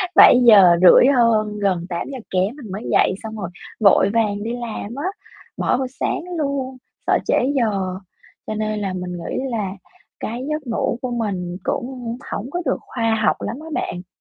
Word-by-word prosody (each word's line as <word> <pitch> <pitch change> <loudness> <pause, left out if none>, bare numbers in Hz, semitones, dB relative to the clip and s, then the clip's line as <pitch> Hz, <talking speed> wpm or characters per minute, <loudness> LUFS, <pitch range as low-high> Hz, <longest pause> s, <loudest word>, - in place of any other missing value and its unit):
bảy 250 - +8
giờ 195 -6 +9
rưỡi 185 +7 +8
hơn, 215 -3 +2
gần 185 -4 0
tám 170 -1 -3
giờ 265 - -5
kém 190 +7 0
mình 230 -10 -10
mới 205 +4 -5
dậy - - +3
xong 220 0 -6
rồi 185 -4 -4 0.3
vội 200 -2 +5
vàng 205 -3 0
đi 230 - -3
làm 235 -1 -6
á, 290 +5 -4 0.5
bỏ - - +1
bữa 265 - -1 0.2
sáng - - 0 0.2
luôn, 275 -3 -2 0.3
sợ - - +4
trễ - - +2 0.2
giờ, 195 -6 0 0.5
cho 215 - -3
nên 215 0 -2
là 195 -2 -3
mình 180 -1 -5
nghĩ 170 -1 -5 0.2
là 210 -5 -2 0.5
cái 235 +3 -4
giấc 305 -3 -3
ngủ 235 +1 -1
của 255 - -3
mình 190 -7 -3
cũng 245 -2 -3
hổng 235 +6 -4
có 350 - -2
được - - +1
khoa 225 -2 -1
học - - +3
lắm - - -4
á 320 - -10
bạn. 180 +1 -4
220 Hz, 190 wpm, -21 LUFS, 195-245 Hz, 0.5 s, giờ